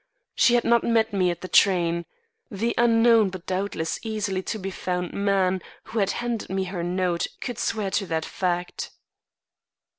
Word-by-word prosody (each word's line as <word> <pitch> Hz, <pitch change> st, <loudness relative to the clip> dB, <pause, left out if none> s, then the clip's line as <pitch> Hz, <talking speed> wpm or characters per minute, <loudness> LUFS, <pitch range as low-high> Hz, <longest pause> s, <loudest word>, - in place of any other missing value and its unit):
She 245 Hz, -, +4 dB
had 240 Hz, -, +3 dB
not 235 Hz, 0 st, +3 dB
met 225 Hz, -2 st, +2 dB
me 185 Hz, -2 st, +2 dB
at 175 Hz, -1 st, -4 dB
the 185 Hz, -, -5 dB
train. 170 Hz, -3 st, +3 dB, 0.4 s
The 225 Hz, +4 st, -1 dB
unknown 230 Hz, -2 st, +5 dB
but 185 Hz, -1 st, -9 dB
doubtless 185 Hz, -4 st, -2 dB
easily 210 Hz, -4 st, -2 dB
to 220 Hz, -, -4 dB
be 195 Hz, -1 st, -5 dB
found 180 Hz, -1 st, -3 dB
man 190 Hz, -2 st, +1 dB, 0.2 s
who 225 Hz, -, -4 dB
had 200 Hz, -1 st, +2 dB
handed 240 Hz, -2 st, -3 dB
me 190 Hz, 0 st, -1 dB
her 185 Hz, -1 st, -4 dB
note 175 Hz, 0 st, 0 dB
could 245 Hz, -3 st, -5 dB
swear 210 Hz, -3 st, -1 dB
to 195 Hz, 0 st, 0 dB
that 160 Hz, -1 st, -1 dB
fact. 175 Hz, -1 st, -2 dB
195 Hz, 170 wpm, -25 LUFS, 180-220 Hz, 0.4 s, unknown